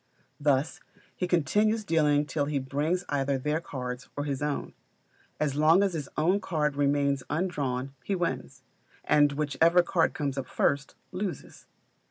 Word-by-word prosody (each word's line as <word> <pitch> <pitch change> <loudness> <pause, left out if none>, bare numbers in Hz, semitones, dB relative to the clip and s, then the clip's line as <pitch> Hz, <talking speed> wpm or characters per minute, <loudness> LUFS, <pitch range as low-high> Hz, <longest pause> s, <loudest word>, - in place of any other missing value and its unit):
Thus 145 +1 +1 0.4
he 180 - -2
continues 210 +7 +2
dealing 150 -5 +2
till 145 -1 -1
he 145 0 -1
brings 145 +7 -1
either 140 -1 0
their 150 +4 -1
cards, 125 -4 -6
or 145 - -1
his 140 -2 -3
own. 145 -1 -2 0.7
As 150 -3 0
long 155 +6 +5
as 195 -2 0
his 150 -4 -4
own 180 +6 +3
card 150 -7 -1
remains 140 -1 +1
undrawn 140 -6 -2
he 200 - -1
wins; 175 -2 -3 0.4
and 145 -1 +4
whichever 155 +4 +3
card 170 -1 +1
comes 140 -2 -2
up 130 - -5
first, 140 -1 0 0.2
loses. 190 -1 -6
150 Hz, 150 wpm, -28 LUFS, 140-170 Hz, 0.7 s, long